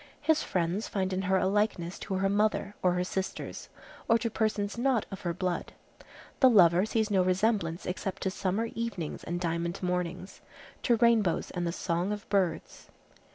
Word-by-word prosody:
His 315 +1 +2
friends 180 +4 -1
find 190 -2 -1
in 185 - 0
her 190 0 +2
a - - +1
likeness 195 -3 0
to 190 - -4
her 195 +1 +1
mother, 205 0 +1
or 180 -1 +3
her 180 0 0
sisters, 190 +1 -4 0.4
or 230 - +5
to 230 0 -2
persons 210 -2 -1
not 240 -2 +1
of 195 - -7
her 175 - -1
blood. 180 +1 -3 0.7
The 260 - +7
lover 185 -3 +5
sees 220 -1 0
no 190 -2 +4
resemblance 185 -2 +1
except 185 +1 -4
to 190 - 0
summer 195 +4 -1
evenings 225 -9 -4
and 175 +1 -3
diamond 170 +1 -2
mornings, 180 +1 -3 0.4
to 240 - +3
rainbows 225 -6 +2
and 175 -1 -2
the - - 0
song 175 +2 -1
of 210 -1 -5
birds. 180 - -1
190 Hz, 175 wpm, -29 LUFS, 180-215 Hz, 0.7 s, The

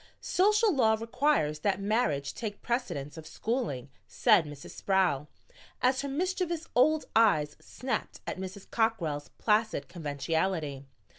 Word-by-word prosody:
"Social 420 +2 +3
law 220 -4 +4
requires 230 - +1
that 195 +2 0
marriage 195 - 0
take 210 -3 -6
precedence 170 - -2
of 160 - -9
schooling," 205 - -3 0.2
said 165 - +4
Mrs. 145 -1 -9
Sproul, 180 -7 +1 0.5
as 255 +1 +2
her 280 - -4
mischievous 345 +1 -1
old 305 +5 +4
eyes 155 -10 +4
snapped 255 +1 -4
at - - -4
Mrs. 190 +1 -7
Cockrell's 170 -11 0
placid 215 -9 +1
conventionality. 155 -2 -2
205 Hz, 125 wpm, -30 LUFS, 150-255 Hz, 0.5 s, law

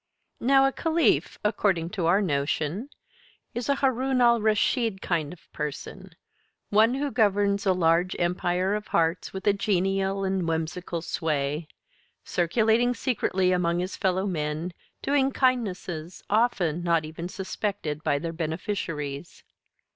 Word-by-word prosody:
Now 270 +2 +5
a 270 - +3
Caliph, 325 +3 +1
according 195 -5 +1
to 185 -6 -1
our 190 +5 +4
notion, 155 - -1 0.6
is 240 +3 -4
a 280 - +4
Haroun 265 -1 +1
al 235 -2 +5
Raschid 220 0 +1
kind 165 -5 -1
of 180 - -15
person; 150 -2 -6 0.6
one 220 +4 +4
who 285 +1 -2
governs 200 -3 +2
a 190 - +5
large 175 +1 +2
empire 180 +2 0
of 210 0 -3
hearts 165 +1 0
with 190 0 -7
a 205 - +5
genial 195 0 0
and 190 -2 0
whimsical 165 +1 -3
sway; 150 -1 -2 0.6
circulating 220 +7 +2
secretly 190 -7 0
among 175 -1 +1
his 180 +2 -2
fellow 190 0 0
men, 160 -1 -2 0.3
doing 275 -1 +2
kindnesses 190 - -1
often 190 -7 +2
not 170 -2 +1
even 165 +3 -6
suspected 190 -5 -4
by 145 - +2
their 165 +2 -4
beneficiaries. 160 -3 -4
185 Hz, 130 wpm, -26 LUFS, 165-215 Hz, 0.6 s, Now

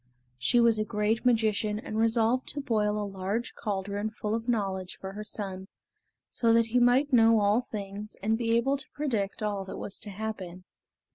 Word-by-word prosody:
She 240 - +3
was 230 -2 +4
a - - +2
great 215 +2 0
magician 215 -3 +2
and 215 0 -6
resolved 230 +3 +2
to 290 - 0
boil 215 -6 0
a 210 - -2
large 200 +4 -3
caldron 205 0 -3
full 215 -1 -4
of 230 +2 -2
knowledge 195 -5 -1
for 190 - -6
her 210 +1 -6
son, 190 -3 -5 0.6
so 230 -1 +2
that 230 0 +5
he 235 +2 +1
might 255 +4 +3
know 225 -2 +6
all 205 +3 +3
things 205 -2 -6
and 220 +2 +2
be 230 0 +1
able 270 +4 +1
to - - -6
predict 225 -9 -2
all 205 -2 -1
that 190 - -7
was 200 - -4
to 210 - -8
happen. 195 -3 -6
215 Hz, 190 wpm, -28 LUFS, 200-230 Hz, 0.6 s, know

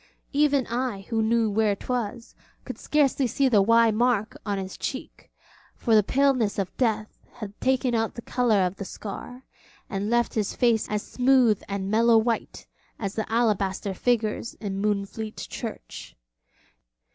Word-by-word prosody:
Even 285 -2 +3
I, 240 -4 -2
who 225 -2 +1
knew 225 0 +2
where 210 -1 +2
'twas, 235 +1 -4 0.3
could - - -7
scarcely 280 -3 +2
see 270 +4 +1
the 215 -6 +4
'Y' 230 +2 +5
mark 225 -1 +1
on 200 -1 0
his 190 -1 -5
cheek, 265 - -6 0.4
for 230 - 0
the 215 - +7
paleness 255 -2 +1
of 195 -2 -3
death 220 -4 -1
had 205 -3 -8
taken 260 -1 +1
out 225 -1 0
the 235 - -7
colour 220 -7 +2
of 180 +2 -3
the - - -5
scar, 235 +6 -8 0.5
and 200 0 -2
left 240 0 +1
his 210 -3 -1
face 235 -3 +2
as 210 0 -1
smooth 250 -4 +3
and 200 0 -3
mellow 230 +1 +5
white 225 0 -1 0.3
as 200 -3 -4
the 220 0 -4
alabaster 205 -4 0
figures 230 +1 -1
in 195 -2 -4
Moonfleet 210 +1 -2
church. 225 -3 -7
225 Hz, 155 wpm, -25 LUFS, 205-245 Hz, 0.5 s, the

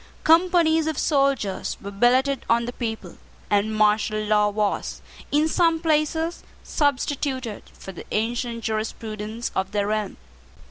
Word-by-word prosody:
Companies 325 -1 +4
of 315 -3 -2
soldiers 275 - 0
were 200 - -7
billeted 255 +6 +2
on 235 0 +3
the 245 - -5
people; 225 -3 -5 0.3
and 205 +1 +2
martial 215 0 +2
law 210 0 +2
was, 205 -1 -2 0.3
in 300 +2 +3
some 330 0 +2
places, 320 +1 0 0.2
substituted 270 -5 -1 0.2
for 195 - -9
the 180 - -11
ancient 230 +1 -2
jurisprudence 220 +1 -4
of 190 +1 -2
the 205 -1 +1
realm. 210 -1 -2
235 Hz, 130 wpm, -24 LUFS, 215-295 Hz, 0.3 s, Companies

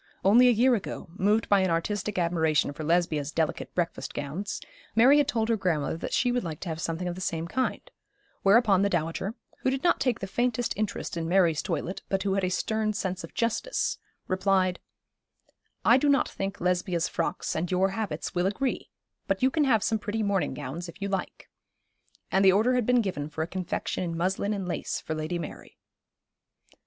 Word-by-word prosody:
Only 235 +6 +7
a - - +7
year 245 +3 +4
ago, 205 -4 -4
moved 205 +4 +1
by 200 - +5
an 190 -1 +2
artistic 195 +5 -1
admiration 160 -4 +1
for 155 - -6
Lesbia's 160 -3 +1
delicate 160 -1 -1
breakfast 175 -1 -2
gowns, 150 +8 -4 0.4
Mary 260 +6 +7
had 290 - +2
told 225 -2 0
her 230 - +2
grandmother 165 -6 -1
that - - -5
she 245 +1 +2
would 245 0 0
like 160 -3 -5
to 180 - -4
have 160 0 -4
something 165 +2 -2
of 175 - -2
the 185 - -8
same 165 -2 -2
kind, 255 +8 -1 0.6
whereupon 200 -1 +5
the 200 - +3
dowager, 175 +4 -2 0.2
who - - +1
did 265 0 -2
not 345 - +3
take 250 -4 +1
the 195 - -3
faintest 240 +3 0
interest 210 -4 -3
in 165 0 -2
Mary's 175 -4 +3
toilet, 170 +2 -3
but 195 -1 0
who 195 -1 0
had 195 0 0
a 185 - +1
stern 215 +3 0
sense 190 -3 -3
of - - -10
justice, 235 - -1 0.3
replied 185 -1 +1 1.1
'I 240 - +7
do 290 +2 +2
not 280 - +3
think 195 0 -4
Lesbia's 180 -1 0
frocks 170 - -2
and 165 +2 -1
your 190 +1 +2
habits 210 0 -4
will 180 0 +1
agree, 255 +7 -2 0.4
but 195 +4 0
you 260 - +4
can 300 +1 +2
have 225 -6 +3
some 220 0 +1
pretty 215 +1 -2
morning 200 -2 0
gowns 150 +5 -6
if 170 - -12
you 200 0 -3
like;' 195 -1 -4 0.8
and 190 - +3
the 190 - +8
order 220 +6 +3
had 250 -3 +1
been 250 -1 +4
given 155 -8 -3
for 155 +1 -3
a - - -4
confection 185 0 -3
in 170 -2 -3
muslin 190 +4 0
and 195 -3 -3
lace 175 - -2
for 160 - -4
Lady 155 +3 -2
Mary. 165 -3 -8
190 Hz, 200 wpm, -27 LUFS, 170-220 Hz, 1.1 s, the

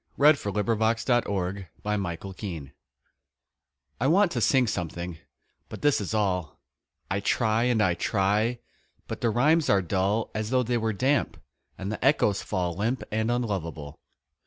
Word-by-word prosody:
A 150 +2 +7
SCRAWL 105 -3 0 2.4
I 130 - +1
want 185 +4 +4
to 120 - -2
sing 125 +4 +4
something 85 -4 -4 0.5
but - - -8
this 145 -6 +3
is 100 +2 -3
all 90 -7 -1 0.5
I 95 - +1
try 110 +2 +1
and 120 -4 +2
I 90 - +3
try, 105 +6 +1 0.5
but - - -6
the 120 - +2
rhymes 150 +8 +3
are 95 -1 +4
dull 100 +5 0
As 110 0 -3
though 130 0 +2
they 120 0 0
were 110 0 0
damp, 130 +6 0 0.4
and 95 +2 -4
the 110 - -5
echoes 125 -7 +3
fall 90 -2 -2
Limp 115 +7 -1
and 110 +1 0
unlovable. 95 -11 -3
110 Hz, 135 wpm, -27 LUFS, 95-120 Hz, 2.4 s, A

